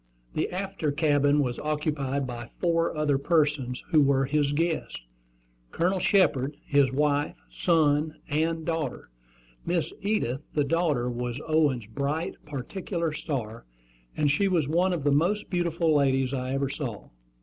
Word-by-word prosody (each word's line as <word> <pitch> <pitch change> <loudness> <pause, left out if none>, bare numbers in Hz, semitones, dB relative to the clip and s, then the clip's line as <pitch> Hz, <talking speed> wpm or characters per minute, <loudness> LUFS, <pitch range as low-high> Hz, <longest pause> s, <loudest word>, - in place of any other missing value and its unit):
The - - -1
after 190 -4 -2
cabin 145 -1 +3
was 125 -2 -3
occupied 150 -3 -1
by 120 -2 -6
four 165 -2 +1
other 145 -3 +2
persons, 145 -5 +1
who 155 - +6
were 135 -1 +3
his 145 +1 +1
guests, 165 +2 -1 0.7
Colonel 185 - 0
Shepard, 145 -9 +2
his 140 -2 +3
wife, 145 +1 +1 0.2
son, 155 - +2
and 160 +2 0
daughter. 165 - -3 0.5
Miss 170 -2 -1
Edith, 195 - 0
the 150 - +3
daughter, 150 -5 +1
was 120 +1 -3
Owen's 150 -7 +2
"bright 140 - -2
particular 165 +4 -3
star," 115 - -4 0.5
and 150 -2 +3
she 195 +7 +2
was 170 -7 +1
one 175 +5 +2
of 170 -5 -2
the 145 - +3
most 180 +10 +1
beautiful 170 -2 0
young 155 - +5
ladies 135 -1 +2
I 130 0 -2
ever 135 0 0
saw. 130 -6 -5
150 Hz, 145 wpm, -27 LUFS, 135-165 Hz, 0.7 s, who